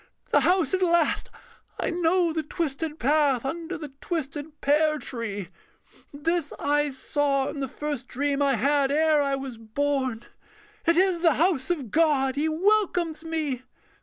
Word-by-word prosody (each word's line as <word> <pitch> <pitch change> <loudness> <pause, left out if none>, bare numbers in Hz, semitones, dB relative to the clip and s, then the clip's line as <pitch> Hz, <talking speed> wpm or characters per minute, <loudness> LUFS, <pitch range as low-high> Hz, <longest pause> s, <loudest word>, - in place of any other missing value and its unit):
The - - +5
house 365 0 +2
at 375 - +1
last: 340 -3 +2 0.5
I - - 0
know 345 0 +2
the 320 - -1
twisted 310 0 -3
path 280 -3 +2
Under 335 +5 -4
the 300 -2 -7
twisted 300 -2 -4
pear 305 +2 +2
tree: 220 - -4 0.6
this 315 +2 -1
I 295 0 +1
saw 275 0 0
In 290 - -6
the 270 - -2
first 290 -2 -5
dream 285 +2 -1
I 275 -2 +3
had 280 +3 +2
ere 310 0 +3
I 275 -1 +1
was 265 -4 -7
born. 260 +1 -1 0.6
It 335 0 +4
is 370 -2 +3
the 330 -3 +4
house 325 -5 +1
of 285 - -2
God. 285 -5 +2
He 305 +3 0
welcomes 350 -2 +1
me. 310 -6 -2
295 Hz, 155 wpm, -26 LUFS, 275-330 Hz, 0.6 s, The